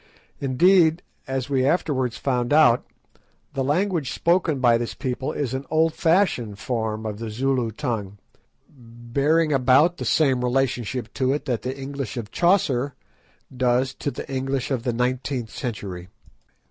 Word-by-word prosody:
Indeed, 165 +5 +4 0.2
as 130 -1 -2
we 135 -2 +1
afterwards 130 -5 0
found 125 -2 -1
out, 125 -6 +5 0.7
the 135 - -1
language 165 0 0
spoken 170 -4 +1
by 120 -2 +4
this 120 - -4
people 130 +3 -3
is 135 -5 -3
an 130 +1 -3
old 160 0 +2
fashioned 160 - +1
form 110 -2 -3
of 105 -1 -4
the 115 -1 -5
Zulu 125 +1 0
tongue, 110 -5 -4 0.5
bearing 135 +6 -1
about 135 +6 +4
the - - -5
same 135 -5 +2
relationship 125 -2 -1
to 130 0 +1
it 145 - -3
that 120 -6 -1
the 130 +3 -4
English 135 -4 -5
of 110 -2 -5
Chaucer 145 -8 +2 0.6
does 125 +1 +1
to 145 - -3
the - - -7
English 135 0 -2
of 130 -3 0
the 125 0 -1
nineteenth 125 -1 -2
century. 100 -7 -5
130 Hz, 145 wpm, -23 LUFS, 120-145 Hz, 0.7 s, out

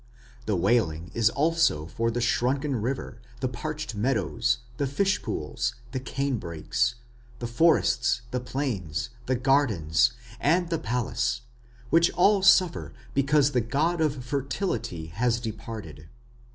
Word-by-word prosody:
The 105 - +1
wailing 85 -4 +1
is 115 -2 +3
also 155 - +2
for 115 +8 -1
the 120 +1 -2
shrunken 130 +4 +1
river, 120 0 -4 0.2
the 130 - 0
parched 155 +2 -5
meadows, 120 +2 +1 0.2
the 140 - 0
fishpools, 140 - -1 0.2
the 130 - -2
cane 135 -1 -2
brakes, 110 +10 -1 0.4
the 120 - -5
forests, 120 -2 +2
the 125 - -1
plains, 115 - -3 0.2
the 130 - +2
gardens, 120 - +2 0.3
and 170 +3 +2
the 165 - +1
palace, 120 +1 -1 0.5
which 170 +1 +5
all 200 +2 +4
suffer 185 -2 +4 0.2
because 140 +1 +3
the 125 -3 +2
god 160 +9 0
of 140 -5 0
fertility 130 - -2
has 115 +9 0
departed. 110 -9 -7
125 Hz, 125 wpm, -27 LUFS, 115-145 Hz, 0.5 s, which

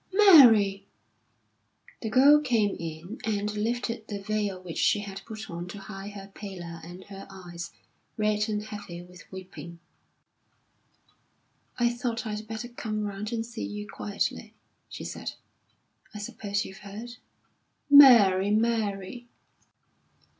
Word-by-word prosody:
"Mary!" 225 - +7 1.1
The 220 - -3
girl 280 +5 +6
came 230 -8 +1
in, 170 +5 -7
and 210 -1 -1
lifted 230 +1 -2
the 205 -2 -4
veil 205 -2 -2
which 180 -3 -6
she 205 - +3
had 195 -1 -7
put 220 -1 -7
on 170 +1 -6
to 190 - -8
hide 195 +1 -8
her 195 -1 -10
pallor 175 -6 -8
and 175 +3 -10
her 195 0 -10
eyes, 175 -3 -8 0.5
red 210 0 +1
and 210 -1 -2
heavy 205 -5 -8
with 180 +1 -16
weeping. 170 -3 -9 2.0
"I 240 -1 +3
thought 240 -1 -3
I'd 215 0 -5
better 225 +2 -5
come 215 -3 -4
round 205 +2 -5
and 230 -1 -2
see 235 0 -7
you 210 0 -5
quietly," 200 0 -3 0.3
she - - -8
said. - - -5 0.8
"I - - -4
suppose 205 -1 -3
you've 195 - -10
heard?" 220 +5 -9 0.7
"Mary, 230 -10 +8
Mary!" 220 0 -1
210 Hz, 130 wpm, -27 LUFS, 195-225 Hz, 2.0 s, Mary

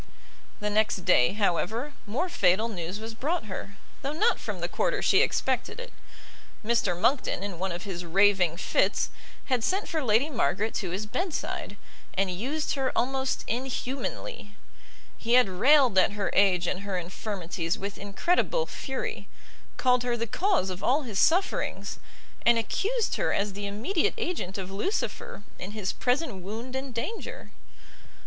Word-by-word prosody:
The 210 0 0
next 210 -3 +1
day, 125 -8 +5
however, 220 - 0
more 255 - 0
fatal 215 - +3
news 185 -1 -4
was 225 +1 -6
brought 300 +6 -1
her, 200 0 -7 0.2
though 275 - -2
not 425 +10 +2
from - - -5
the - - -1
quarter - - 0
she - - +5
expected 445 - 0
it: - - -8 0.7
Mr 210 -6 +1
Monckton, 250 -3 +1
in 195 -4 -5
one 190 0 -1
of 175 +1 -5
his 180 -3 -4
raving 180 -1 +4
fits, - - +1 0.3
had 255 -4 +1
sent 385 - 0
for 315 -3 -1
Lady 230 +4 +3
Margaret 220 - 0
to 190 - -2
his 190 +5 -3
bed 345 - -2
side, 205 - -4 0.4
and 190 -1 +1
used 270 - -1
her 270 -2 0
almost 265 +2 0
inhumanly: 260 - -4 0.6
he 235 +1 0
had 250 -3 +6
railed 255 +5 +5
at 185 - +3
her 205 -1 -1
age 190 -3 +4
and 185 - -1
her 200 -1 -3
infirmities 180 -1 -3
with 200 +1 -5
incredible 350 - +1
fury, 265 - -4 0.5
called 250 -1 +3
her 240 -1 0
the 230 - -1
cause 250 - +1
of 185 - -7
all 285 +4 +3
his 215 -6 -3
sufferings, 345 +5 +1 0.4
and 235 0 +6
accused 425 - 0
her - - +1
as 200 0 0
the 200 +1 -4
immediate 300 - 0
agent 345 - -3
of 190 -1 -5
Lucifer 205 - -3 0.2
in 190 +3 -6
his 210 -3 -1
present 255 -3 0
wound 225 +7 -6
and 265 0 -3
danger. 245 - -5
220 Hz, 160 wpm, -28 LUFS, 195-275 Hz, 0.7 s, had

